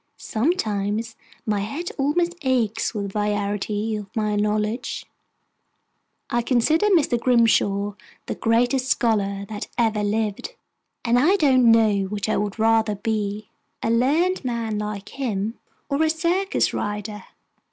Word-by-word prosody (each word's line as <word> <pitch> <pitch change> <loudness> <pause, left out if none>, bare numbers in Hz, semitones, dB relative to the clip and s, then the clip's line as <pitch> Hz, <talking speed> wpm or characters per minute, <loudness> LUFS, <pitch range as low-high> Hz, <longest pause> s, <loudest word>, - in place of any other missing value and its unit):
Sometimes 220 - -1 0.3
my 210 -3 0
head 280 - -4
almost 335 +5 +1
aches 240 -5 0
with 205 - -2
the 210 - -3
variety 205 +1 -1
of 205 -2 -6
my 215 -2 0
knowledge. 210 +3 -1 1.3
I 240 - +2
consider 275 - +2
Mr. 315 - +3
Grimshaw 215 -4 +2 0.3
the - - -3
greatest 245 +3 +1
scholar 200 -5 +1
that 210 0 -6
ever 220 -3 +1
lived, 215 - -2 0.5
and 240 +1 +4
I 340 +9 +4
don't 260 -9 +4
know 215 -3 +3
which 205 +1 -3
I 215 - +1
would 205 0 -2
rather 220 -1 +2
be 210 0 -3 0.3
a 225 - +1
learned 300 +11 +2
man 230 -4 -2
like 210 -1 -5
him, 225 -5 -3 0.3
or 280 +2 0
a 320 - +3
circus 355 +5 +1
rider. 210 0 -4
225 Hz, 130 wpm, -23 LUFS, 210-255 Hz, 1.3 s, and